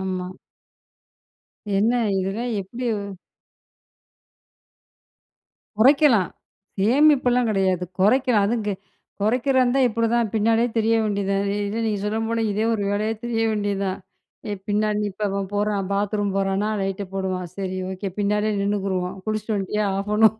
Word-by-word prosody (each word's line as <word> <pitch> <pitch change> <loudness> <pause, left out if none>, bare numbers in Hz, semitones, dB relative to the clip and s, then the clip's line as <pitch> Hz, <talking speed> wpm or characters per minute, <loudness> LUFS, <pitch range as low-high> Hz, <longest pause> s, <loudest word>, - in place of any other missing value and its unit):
ஆமா. 185 -1 -3 1.5
என்ன 215 +4 +3 0.3
இதெல்லாம் 200 +6 -2
எப்படி? 235 +6 -6 2.9
குறைக்கலாம். 255 - +5 0.5
சேமிப்பெல்லாம் 250 0 +4
கிடையாது. 190 -3 +1 0.2
குறைக்கலாம் 230 +1 +4
அதுவும் 225 0 -1
கெ 205 - +1 0.5
குறைக்கிறந்தா 255 +4 +2
இப்படிதான் 230 0 +1
பின்னாடியே 225 +2 +2
திரிய 225 +1 +3
வேண்டியதுதான். 200 -1 0 0.2
இல்ல 215 +3 -2
நீங்க 210 -2 0
சொன்ன 215 +2 -1
போல, 230 0 0
இதே 215 +2 0
ஒரு 210 - -2
வேலையா 215 +2 0
திரிய 230 -1 0
வேண்டியது 205 -2 -1
தான். 190 0 -2 0.5
ஏ - - -2 0.2
பின்னாடி 210 0 +1
நீ - - 0
இப்போ 210 +3 -4
அவன் 195 0 -2
போறான் 205 -1 0
பாத்ரூம் 205 0 0
போறானா 195 +2 0
லைட்ட 195 +1 -2
போடுவான், 185 -2 -2
சரி 190 -1 -3
ஓகே 190 +1 -4
பின்னாடியே 210 +1 +1
நின்னுக்குருவோம் 195 -2 -1
குளிச்சிட்டு 215 0 -2
வந்துட்டியா, 205 +2 -1
ஆப் 200 +1 -4
பண்ணணும். 220 0 +5
210 Hz, 125 wpm, -23 LUFS, 195-225 Hz, 2.9 s, குறைக்கலாம்